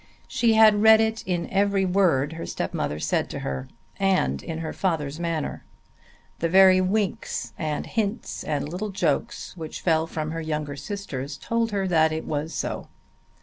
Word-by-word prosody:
She 230 -2 +2
had 215 -2 +6
read 220 0 +8
it 220 0 +1
in 175 -2 -1
every 195 0 +2
word 175 -6 +2
her 165 - -6
stepmother 75 - -2
said 75 - 0
to - - -5
her 65 -1 -4 0.3
and 185 - +2
in 160 - -5
her 160 -1 -4
father's 160 -5 -1
manner. 165 -3 -3 0.8
The 165 - 0
very 185 +1 +7
winks 195 +1 -1
and 155 -2 -3
hints 220 0 -2
and 145 -2 -2
little 185 +7 -4
jokes 195 - -1
which 160 -3 -7
fell 160 -2 +2
from 155 -1 -4
her 165 0 -3
younger 150 -2 -3
sisters 145 -7 -5
told 230 +3 -1
her 200 -3 -1
that 160 -3 +3
it 160 0 -3
was 150 +1 -2
so. - - -3
170 Hz, 165 wpm, -25 LUFS, 155-200 Hz, 0.8 s, read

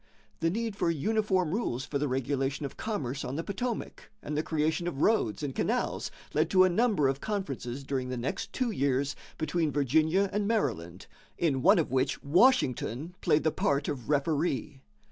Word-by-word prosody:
The 165 - +2
need 225 +3 -2
for 175 - +1
uniform 185 +1 +1
rules 135 - -1
for 140 - -2
the 145 - 0
regulation 135 +2 -1
of 135 - -6
commerce 140 - -3
on 130 - -4
the 165 - -2
Potomac 220 +5 -4
and 150 - -4
the 150 - +2
creation 160 +2 0
of 150 -5 -2
roads 135 - +2
and 140 -2 -2
canals - - -1 0.2
led 155 +2 +2
to 185 0 +6
a 185 - +5
number 205 - +3
of 135 +1 -1
conferences 140 - -3
during 130 -2 -2
the 125 - -3
next 120 +3 -3
two 255 -3 -1
years 140 -4 0 0.2
between 160 -1 0
Virginia 155 +8 +2
and 205 0 0
Maryland, 100 - -1 0.3
in 145 -6 +1
one 195 +7 +6
of 160 -7 0
which 130 +1 0
Washington 160 - +2
played 155 -3 +3
the 160 - +2
part 140 0 0
of 130 -3 -4
referee. 145 -1 0
150 Hz, 180 wpm, -29 LUFS, 135-185 Hz, 0.3 s, to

